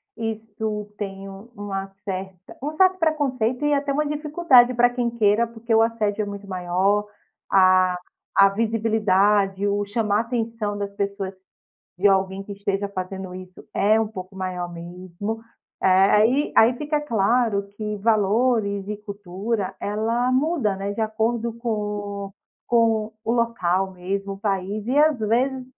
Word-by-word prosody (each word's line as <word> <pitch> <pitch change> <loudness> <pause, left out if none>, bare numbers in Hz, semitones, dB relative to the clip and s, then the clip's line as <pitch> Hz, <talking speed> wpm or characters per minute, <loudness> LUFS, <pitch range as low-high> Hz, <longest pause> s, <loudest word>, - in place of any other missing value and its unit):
isto 220 -1 -4
tem 195 -1 -6
uma 195 -1 -6 0.2
certa 190 -1 -6
um 295 - -2
certo 370 +4 +3
preconceito 285 -6 0
e 295 - +3
até 280 0 0
uma 300 +2 +1
dificuldade 295 -4 +4
para 245 0 +4
quem 245 -1 -1
queira, 225 0 +2
porque 230 0 -2
o 225 - +6
assédio 220 -2 0
é - - -3
muito 200 0 -7
maior, 190 +3 +1 0.5
a 185 -1 +5 0.4
a 195 0 +8
visibilidade, 205 -2 +2
o 205 0 0
chamar 210 0 +1
atenção 225 -3 -3
das 200 -1 -4
pessoas 200 -1 -3 0.7
de 200 - +3
alguém 190 0 +1
que 205 - -7
esteja 200 0 -2
fazendo 190 -1 -6
isso 185 0 -11
é 215 +2 +3
um 225 - 0
pouco 190 -2 -9
maior 180 -2 -4
mesmo. 180 +5 -6 0.4
Eh, - - +3
aí 210 +9 +4
aí 230 +3 +6
fica 300 +1 -1
claro 230 -4 +1
que 210 -1 -3
valores 215 -1 +1
e 210 - -3
cultura, 205 0 -4
ela 225 +4 0
muda, 270 - +1
né, 200 +1 -3
de 205 - -5
acordo 225 +2 0
com 235 0 -6 0.6
o 195 - -30 0.3
com 225 -2 +2
o 225 - -1
local 195 -6 0
mesmo, 195 +2 -4
o 195 - -8
país, 200 0 -2
e 275 +3 +2
às 305 -1 +5
vezes 255 +4 +1
210 Hz, 150 wpm, -23 LUFS, 195-235 Hz, 0.7 s, a